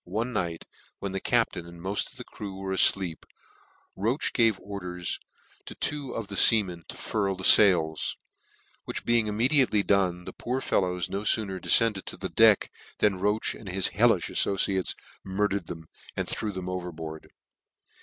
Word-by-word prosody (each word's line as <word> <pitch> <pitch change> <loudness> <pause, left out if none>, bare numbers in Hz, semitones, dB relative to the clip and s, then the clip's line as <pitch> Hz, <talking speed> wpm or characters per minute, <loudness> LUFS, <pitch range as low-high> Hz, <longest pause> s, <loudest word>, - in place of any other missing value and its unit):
One 110 +7 -3
night, 85 -5 -3 0.3
when 100 - -4
the 95 - -2
captain 115 -8 0
and 85 0 -12
moft 95 +4 -3
of - - -17
the - - -7
crew 100 -2 -9
were 95 0 -4
afleep, 95 -2 +1 0.7
koche 115 +9 -1
gave 115 -5 +3
orders 90 -3 -5 0.5
to - - -9
two 145 -4 -3
of 115 - -4
the 100 - -8
feamen 95 -7 +4
to - - -9
furl 100 -3 -2
the 95 - -9
fails; 85 -7 +4 0.7
which - - -5
being 120 -2 +2
immediately 115 0 +2
done, 90 -3 +1
the - - -7
poor 125 +2 -3
fellows 90 -8 -1
no 100 - -4
fooner 100 -3 +1
deicended 110 -2 +3
to - - -7
the - - -5
deck, - - +5 0.3
than 100 -3 +1
Roche 105 +3 0
and 100 - -10
his 95 +1 0
hellifh 110 -2 +3
afibciar.es 95 -2 0 0.3
murdered 100 -1 -1
them, 80 -2 -8 0.3
and - - -2
threw 110 - -3
them 95 -2 -6
overboard. 85 -4 -6
95 Hz, 165 wpm, -27 LUFS, 90-110 Hz, 0.7 s, deck